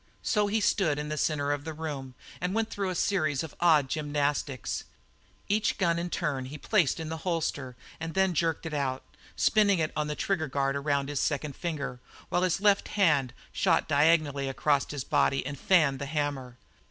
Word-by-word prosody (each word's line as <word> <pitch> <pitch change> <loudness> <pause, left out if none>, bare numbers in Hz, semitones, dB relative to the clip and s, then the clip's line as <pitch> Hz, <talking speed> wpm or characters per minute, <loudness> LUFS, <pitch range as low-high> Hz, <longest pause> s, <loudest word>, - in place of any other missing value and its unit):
So 210 -1 +2
he 215 +2 0
stood 190 -8 +2
in 150 0 -4
the 155 - -2
centre 145 -1 0
of 145 0 -2
the 160 +1 -5
room 140 -5 -5 0.3
and 180 +3 -1
went 225 0 0
through 195 -2 -2
a 185 - -3
series 155 -8 +1
of 160 - -8
odd 155 -5 +4
gymnastics. 145 -3 -2 0.6
Each 210 +1 +1
gun 170 -3 +1
in 175 +1 -3
turn 145 -8 -2
he 140 +4 -7
placed 170 -2 +1
in 160 -1 -4
the 160 - -3
holster 155 -7 -2 0.2
and 160 +1 -5
then 190 -1 +3
jerked 165 0 0
it 160 - -4
out, 135 -3 -1 0.3
spinning 205 -3 +3
it 155 -2 0
on 150 0 -1
the 150 - -3
trigger 165 -3 -1
guard 135 0 0
around 140 -1 0
his 145 -2 -2
second 145 -1 -1
finger, 140 -7 -4 0.3
while 175 - +1
his 185 0 +1
left 200 0 +3
hand 150 -10 +3 0.2
shot - - +2
diagonally 145 -2 +3
across 140 +1 +1
his 145 -3 -4
body 135 0 +1
and 140 -1 -5
"fanned" 155 -8 +3
the 140 - -4
hammer. 140 -4 -3
150 Hz, 190 wpm, -28 LUFS, 140-175 Hz, 0.6 s, odd